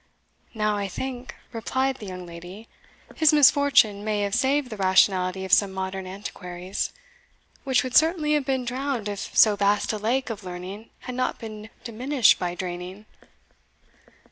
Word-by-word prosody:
"Now, 210 -1 0
I 200 -1 -2
think," 255 +5 -6 0.2
replied 260 +3 -1
the 210 - -9
young 185 -1 -7
lady, 175 +6 -10 0.5
"his 315 -1 +5
misfortune 280 -8 +5
may 210 -1 -1
have 200 -1 -2
saved 265 +2 +1
the 215 - -6
rationality 190 -1 +2
of 190 - -2
some 200 -2 +5
modern 190 0 -4
antiquaries, 185 -1 -5 0.7
which 265 -2 +2
would 255 -1 -5
certainly 315 -1 +4
have 295 -2 +2
been 260 -2 -1
drowned 255 -2 -2
if 205 -1 -5
so 215 -2 +7
vast 205 +1 +1
a 215 - -3
lake 245 +4 0
of 210 -3 -7
learning 185 +4 -8
had 250 - -6
not 255 +1 -1
been 215 -1 -9
diminished 245 +2 +2
by 175 -1 -2
draining." 180 +3 -6
215 Hz, 155 wpm, -25 LUFS, 190-255 Hz, 0.7 s, so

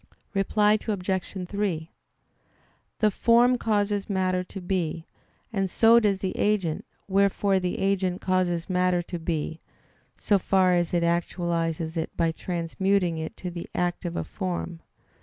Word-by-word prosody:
Reply 210 +2 +3
Obj. 190 -2 -2
3: 180 -5 -2 1.1
The 215 -1 +3
form 240 +4 +4
causes 205 -2 0
matter 185 -2 +1
to 195 - -9
be, 175 -3 -2 0.5
and 195 -2 0
so 230 +5 +6
does 205 -4 +2
the 190 -1 -3
agent; 195 -7 0 0.2
wherefore 195 0 +2
the 180 -1 -2
agent 190 -2 0
causes 180 -2 0
matter 180 -1 +1
to 175 0 -6
be, 160 -1 -3 0.6
so 205 -2 +2
far 185 -1 +3
as 175 0 +1
it 170 - +2
actualizes 170 -1 -1
it 160 - -1
by 165 -1 +2
transmuting 175 +1 -1
it 160 - -6
to 180 - -5
the 170 0 -7
act 175 0 -1
of 175 -1 -4
a - - -1
form. 175 -3 -4
185 Hz, 140 wpm, -26 LUFS, 170-200 Hz, 1.1 s, so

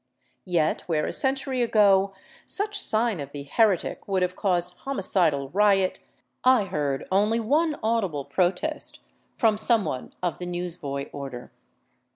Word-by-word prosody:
Yet, 165 -4 +1
where 155 -3 0
a - - -3
century 265 -1 +1
ago 200 -4 +4 0.4
such 415 +1 0
sign 220 -4 +1
of 140 -1 -7
the 145 -1 -6
heretic 190 +5 +1
would 190 -2 +1
have 180 0 -1
caused 180 -3 -1
homicidal 175 - +1
riot, 195 -1 +3 0.4
I 255 -4 +5
heard 145 -7 -2
only 210 +4 +2
one 300 +7 +1
audible 195 -11 0
protest 185 - -1 0.2
— - - -42
from 215 -2 +2
some 225 -1 +3
one 130 - -5
of 175 - -2
the 180 - -5
news 175 -1 -3
boy 140 -5 -4
order. 135 -4 -7
190 Hz, 150 wpm, -25 LUFS, 160-225 Hz, 0.4 s, I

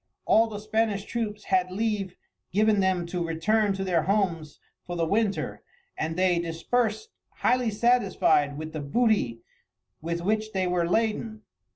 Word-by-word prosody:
All 225 +1 +4
the 215 -2 -6
Spanish 215 -1 -1
troops 210 -3 -4
had 185 -1 +1
leave 200 -1 -2 0.4
given 210 +1 +3
them 190 -2 +1
to 175 0 -3
return 200 +6 +1
to 195 0 -3
their 180 -4 +1
homes 175 -5 -1 0.2
for 175 - -6
the 165 -1 0
winter, 205 +3 -1 0.3
and 160 +1 -3
they 180 -1 +2
dispersed 215 - -1 0.2
highly 250 -2 +2
satisfied 205 -10 +2
with 155 +1 -6
the 155 - -4
booty 145 - +1 0.6
with 170 +2 -3
which 215 +3 -1
they 190 -1 0
were 175 -1 0
laden. 220 +1 -1
195 Hz, 150 wpm, -26 LUFS, 170-220 Hz, 0.6 s, All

